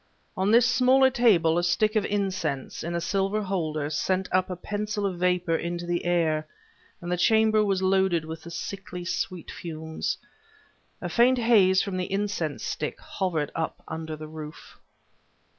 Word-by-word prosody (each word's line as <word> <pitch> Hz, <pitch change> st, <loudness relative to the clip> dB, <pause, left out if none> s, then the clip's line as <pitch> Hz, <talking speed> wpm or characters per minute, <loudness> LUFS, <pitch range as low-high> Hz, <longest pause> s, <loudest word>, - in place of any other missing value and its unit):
On 190 Hz, +2 st, +1 dB
this 230 Hz, +2 st, +6 dB
smaller 260 Hz, +1 st, +4 dB
table, 175 Hz, -10 st, +4 dB
a -, -, -1 dB
stick 210 Hz, +5 st, +2 dB
of 210 Hz, -2 st, +2 dB
incense, 185 Hz, -9 st, -2 dB
in 170 Hz, +1 st, -3 dB
a -, -, +1 dB
silver 195 Hz, +4 st, 0 dB
holder, 155 Hz, -6 st, -2 dB
sent 185 Hz, +5 st, 0 dB
up 185 Hz, 0 st, +2 dB
a 180 Hz, -, -3 dB
pencil 210 Hz, +2 st, -3 dB
of 185 Hz, -3 st, -2 dB
vapor 180 Hz, -2 st, +1 dB
into 170 Hz, +1 st, -3 dB
the 175 Hz, 0 st, -2 dB
air, 160 Hz, -3 st, +1 dB, 0.5 s
and 175 Hz, 0 st, -5 dB
the 180 Hz, -, +1 dB
chamber 220 Hz, +2 st, +4 dB
was 195 Hz, -2 st, 0 dB
loaded 190 Hz, -3 st, +2 dB
with 160 Hz, 0 st, -7 dB
the 170 Hz, -, -10 dB
sickly 180 Hz, 0 st, -6 dB
sweet 180 Hz, -1 st, -3 dB
fumes. 160 Hz, -1 st, -4 dB, 0.8 s
A -, -, -3 dB
faint 250 Hz, +2 st, +4 dB
haze 205 Hz, -6 st, +4 dB
from 195 Hz, -3 st, -3 dB
the 180 Hz, 0 st, -3 dB
incense 195 Hz, -7 st, -2 dB
stick -, -, -3 dB
hovered 165 Hz, -6 st, -2 dB
up 165 Hz, -1 st, -4 dB
under 160 Hz, 0 st, -5 dB
the 155 Hz, 0 st, -8 dB
roof. 155 Hz, -1 st, -10 dB
185 Hz, 165 wpm, -26 LUFS, 165-205 Hz, 0.8 s, this